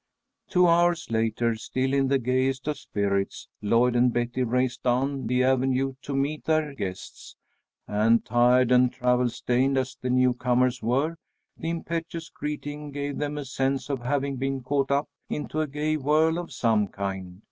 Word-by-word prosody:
Two 180 -1 +4
hours 170 -3 +2
later, 115 +1 +1
still 130 +4 -2
in 135 -1 +2
the 135 +1 +3
gayest 130 +2 0
of 150 -2 -2
spirits, 100 -3 -2
Lloyd 120 +4 +3
and 120 +1 +4
Betty 120 +2 -1
raced 125 +1 0
down 130 +1 0
the 125 +2 +2
avenue 130 +1 +1
to 140 - -5
meet 145 +3 -1
their 155 -2 +1
guests, 95 -8 -7 0.5
and 110 +2 +2
tired 120 +2 +4
and 125 0 +5
travel 125 -1 +1
stained 125 +3 0
as 130 0 -1
the 125 - -2
newcomers 125 0 +2
were, 140 +9 0 0.4
the 165 - -4
impetuous 165 0 -4
greeting 150 0 -5
gave 145 0 -4
them 150 0 -2
a 145 - -4
sense 135 +1 -1
of 135 -3 -2
having 140 +2 -1
been 135 0 -2
caught 135 +1 0
up 140 +1 +1 0.2
into 150 +1 -2
a 155 - -1
gay 150 +2 -1
whirl 155 +4 +2
of 175 -2 -7
some 115 -5 +1
kind. 95 -2 -5
130 Hz, 165 wpm, -26 LUFS, 120-145 Hz, 0.5 s, and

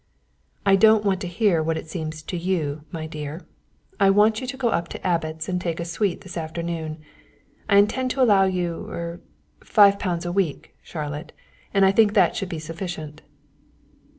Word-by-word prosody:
"I 195 -1 +6
don't 215 +1 +5
want 190 -1 +1
to 185 - -3
hear 175 -2 +2
what 160 +1 -1
it - - -7
seems 155 -1 -5
to 180 - -5
you, 160 -4 -2
my 160 -2 -5
dear, 155 +1 -7 0.5
I 195 - +5
want 210 +2 +4
you 255 - -5
to 265 +1 -5
go 250 -3 +1
up 170 -6 0
to - - -9
Abbot's 160 -2 -1
and 180 -1 -1
take 170 -2 -3
a 170 - -3
suite 175 +2 -1
this 185 -1 -8
afternoon. 165 -1 -4 0.7
I 200 - +5
intend 255 +6 +3
to 265 +1 -1
allow 200 -5 +5
you 180 -3 -2
er 170 0 -5 0.4
five 200 -2 +5
pounds 175 -2 -2
a 175 - -2
week, 180 -5 -2
Charlotte; 150 0 -6 0.4
I 195 -1 +5
think 210 +1 +4
that 185 -5 +4
should 195 - -3
be 170 - -4
sufficient." 160 -1 -6
175 Hz, 180 wpm, -24 LUFS, 160-200 Hz, 0.7 s, I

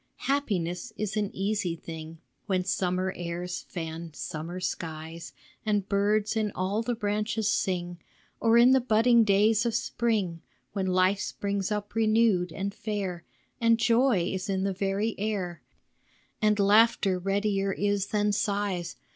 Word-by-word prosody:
Happiness 205 -8 -1
is 210 -1 -2
an 210 -2 0
easy 195 -3 -1
thing 160 0 -8 0.3
When 185 -2 0
summer 185 0 0
airs 175 +1 -4
fan 165 -2 -6
summer 165 +4 -5
skies, 165 -1 -5 0.3
And 205 -3 0
birds 210 +2 +1
in 215 -2 0
all 195 +4 0
the 240 +1 -2
branches 210 0 -1
sing; 175 -2 -1 0.4
Or 230 0 +4
in 240 +2 +7
the 265 0 +5
budding 235 0 +4
days 215 +2 +3
of 235 -2 -1
spring, 215 -8 -1 0.3
When 195 -2 -1
life 185 +2 +3
springs 200 0 -2
up 210 0 -3
renewed 215 -5 +3
and 195 +3 -3
fair, 195 -6 -4 0.3
And 230 -1 +4
joy 230 -3 +3
is 190 +2 -4
in 190 -1 0
the 195 0 0
very 195 +3 -1
air, 195 -5 -2 0.8
And 210 -1 +3
laughter 205 -2 +4
readier 195 +1 0
is 200 0 0
than 210 0 +1
sighs. 200 -3 -1
200 Hz, 140 wpm, -28 LUFS, 180-215 Hz, 0.8 s, in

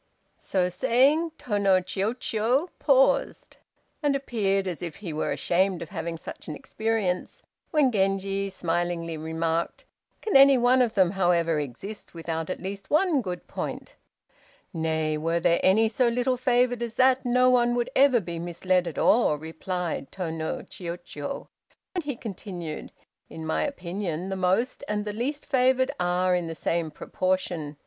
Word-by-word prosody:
So 185 -2 0
saying 275 - +2
Tô 205 -4 -2
no 195 -2 +5
Chiûjiô 220 - 0
paused, - - +2 0.4
and 290 -2 +2
appeared 200 -8 0
as 175 -3 -4
if 170 -3 -5
he 180 -7 -6
were 155 - -1
ashamed 180 0 +1
of 160 - -11
having 165 -2 -4
such - - -9
an 155 - -4
experience, 215 -1 -2 0.3
when 295 -6 +3
Genji 195 -1 0
smilingly 175 -2 -2
remarked, 160 +1 -2 0.4
"Can 430 - -1
any 275 0 +8
one 250 +1 +4
of 235 -2 +1
them, 185 -3 +4
however, 170 -4 +2
exist 150 - -7
without 165 0 -4
at 185 - -3
least 195 +1 -6
one 310 -2 +3
good 180 -5 -5
point?" - - -6 0.8
"Nay, 160 -2 -1
were 165 +2 0
there 170 0 +3
any 215 +4 +4
so 235 +3 +1
little 245 +2 +1
favored 245 -1 +2
as 235 -2 -4
that, 260 0 +4
no 250 0 +4
one 240 -1 +3
would 245 +1 -1
ever 265 -2 +5
be 170 -4 -6
misled 175 +1 0
at 165 - -6
all!" 230 -10 +4
replied 160 0 -4
Tô 175 -4 -4
no 160 -1 -3
Chiûjiô, 170 -5 -6 0.5
and 360 -2 -2
he 285 -3 -2
continued, 180 -8 -6 0.4
"In 160 0 -7
my 160 - 0
opinion, 185 - -3
the 190 - -2
most 190 +9 0
and 210 0 -2
the 210 - -3
least 275 +7 -3
favored 260 -1 +2
are 180 +1 +2
in 175 -2 0
the 165 - -5
same 165 0 -1
proportion. 170 -2 -2
190 Hz, 155 wpm, -26 LUFS, 170-245 Hz, 0.8 s, any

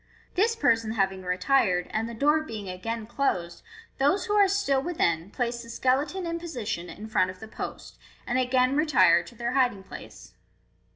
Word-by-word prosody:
This 445 +5 +2
person 230 - +2
having 195 -3 0
retired, 180 0 +1
and 225 +1 -1
the 235 - -7
door 295 +6 +3
being 220 -9 -7
again 220 +5 -4
closed, 185 -9 -2 0.4
those 290 +11 +2
who 415 - -1
are 410 -1 +6
still 380 -9 +1
within 180 - 0
place 235 +1 -2
the 230 - -12
skeleton 280 +10 0
in 335 0 -3
position 225 - -4
in 210 - -9
front 185 -4 +1
of 185 0 -9
the 220 - -9
post, - - -8 0.3
and 250 +2 0
again 255 +1 +2
retire 280 - +5
to 170 +7 -14
their 235 +1 -2
hiding 250 -7 +1
place. 110 - -11
235 Hz, 175 wpm, -27 LUFS, 195-285 Hz, 0.4 s, are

